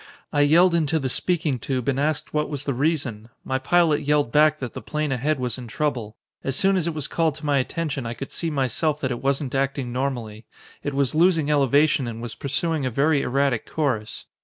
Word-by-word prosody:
I 145 - +3
yelled 170 +5 +5
into 160 -1 +2
the 135 -4 -1
speaking 155 -3 0
tube 130 -1 -3
and 135 -1 +1
asked 150 +1 -1
what 150 0 0
was 145 -2 -4
the 140 - -1
reason. 130 -6 -1
My 130 0 -1
pilot 160 +2 +3
yelled 145 -4 +1
back 155 +1 +4
that 130 -5 -6
the - - -6
plane 150 -1 -2
ahead 135 +3 0
was 125 -1 -2
in 125 - -8
trouble. 115 -3 -2 0.3
"As 135 - -1
soon 195 +6 +3
as 175 -3 0
it 165 - -2
was 150 -3 -3
called 160 -3 0
to 155 - -9
my 145 -2 +2
attention 140 -2 -2
I 115 - -4
could 135 - -7
see 165 - -2
myself 150 +2 0
that 130 - -1
it 120 - -4
wasn't 135 0 -1
acting 135 -2 -1
normally. 120 -5 -3 0.3
It 145 -1 -4
was 140 -3 +1
losing 160 -2 +3
elevation 145 0 +3
and 115 -1 -6
was 115 -1 -6
pursuing 150 +2 -1
a 130 - 0
very 140 +4 +2
erratic 135 -2 0
course. 120 -9 -2
140 Hz, 215 wpm, -24 LUFS, 130-155 Hz, 0.3 s, yelled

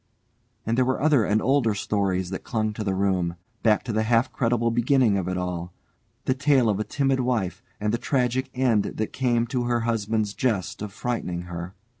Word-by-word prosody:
And 115 +3 +1
there - - +5
were 130 +1 0
other 145 -5 +4
and 105 +1 +1
older 130 -6 +2
stories 95 -3 -1
that 95 - -5
clung 110 -2 -1
to 105 - -4
the 95 -2 -1
room, 95 -3 0 0.3
back 110 -2 +3
to 120 - -4
the 110 - +2
half 115 +3 +2
credible 115 -1 +1
beginning 120 -2 +3
of 95 -3 -1
it 90 0 -1
all, 90 -1 -4 0.5
the 130 - +2
tale 135 -3 +3
of 100 -1 0
a - - +1
timid 135 +2 0
wife 120 -8 -1 0.2
and 105 +1 0
the 120 - 0
tragic 130 -1 0
end 125 -5 +3
that 110 - -4
came 120 -3 +1
to 120 0 -2
her 120 -1 +1
husband's 110 -2 0
jest 105 -9 -1
of 105 -1 -4
frightening 95 -6 -3
her. 90 +2 -7
115 Hz, 200 wpm, -25 LUFS, 100-125 Hz, 0.5 s, there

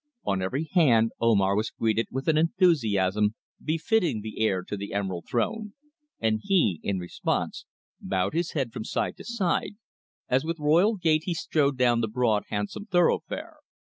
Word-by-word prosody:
On 95 -1 0
every 130 +11 -1
hand 120 - +4
Omar 100 -4 +3
was 110 +2 0
greeted 110 -1 0
with 135 +1 -5
an 160 - +4
enthusiasm 110 - +2 0.3
befitting 165 - +1
the 110 0 -7
heir 95 -4 +1
to 105 - -5
the 100 0 -6
Emerald 95 -4 -3
Throne, 210 - -2 0.4
and 110 -1 +1
he, 135 - +2
in 100 -1 -1
response, 90 -1 -3 0.3
bowed 95 +3 -1
his 170 +1 -1
head 130 -7 -2
from - - -5
side - - -2
to 195 - -10
side, 205 -4 -1 0.5
as 130 +1 +2
with 165 +1 -3
royal 170 +9 +3
gait 160 -3 +1
he 175 - -1
strode 145 -4 0
down 120 -2 +3
the 110 - 0
broad 110 -2 +1
handsome 105 - -4
thoroughfare. 300 - 0
125 Hz, 165 wpm, -26 LUFS, 105-165 Hz, 0.5 s, hand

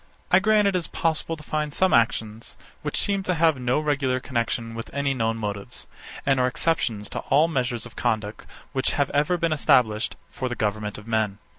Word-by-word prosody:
67. - - +7
I - - +7
grant 210 +1 +4
it 175 -2 0
possible 165 0 -1
to 150 - -12
find 150 0 -2
some 190 0 +3
actions, 115 -1 0 0.3
which - - -3
seem 200 -1 +1
to 185 -1 -1
have 160 -4 +3
no 125 +3 +1
regular 135 -4 0
connexion 115 -2 -2
with 115 0 -7
any 140 -1 +1
known 115 -3 0
motives, 100 -2 -5 0.4
and 135 -1 +3
are 125 - +3
exceptions 120 -8 0
to - - -4
all 150 +4 +5
the 165 - -6
measures 125 -4 -1
of 120 - -12
conduct 105 -1 -2 0.3
which 130 -1 +1
have 145 -1 0
ever 150 +5 +2
been 165 -2 +1
established 115 -7 +2 0.2
for 130 - -3
the 120 - -3
government 105 -1 -2
of 105 - -11
men. 110 -3 0
130 Hz, 200 wpm, -25 LUFS, 115-155 Hz, 0.4 s, 67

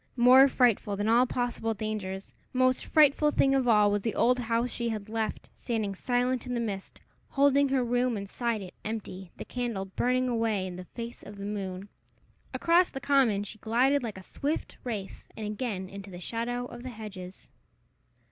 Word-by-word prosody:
More 255 +3 +8
frightful 235 -5 +2
than 205 +2 -1
all 240 +3 +5
possible 240 -2 -2
dangers, 200 -2 -4 0.2
most 255 0 +2
frightful 300 -1 +5
thing 270 -2 +3
of 265 -2 +2
all, 210 -3 +5
was 205 0 +1
the 225 +1 -2
old 250 +1 +3
house 235 +1 0
she 235 0 -2
had 215 -2 -4
left, 220 -1 -3
standing 220 -5 -2
silent 245 +4 0
in 250 - -2
the - - 0
mist, 200 -4 -5 0.3
holding 280 0 +4
her 265 -1 +2
room 245 -1 +1
inside 215 +2 -2
it 185 - -10
empty, 195 -4 -5
the - - -7
candle 235 -6 -3
burning 250 +6 0
away 225 -5 0
in 185 -1 -6
the 180 - -8
face 235 +4 -8
of 205 0 -11
the 200 - -6
moon! 195 -2 -4 0.6
Across 345 +2 +3
the 270 - -6
common 255 -7 +3
she 210 +1 -9
glided 255 +6 +2
like 225 -5 -5
a 190 - -10
swift 290 - -3
wraith, 215 -6 -5
and 220 - -4
again 210 -3 -3
into 200 +1 -9
the 175 -2 -9
shadow 240 +5 -3
of 240 -1 -9
the 255 - -6
hedges. 200 -5 -9
230 Hz, 185 wpm, -29 LUFS, 205-250 Hz, 0.6 s, More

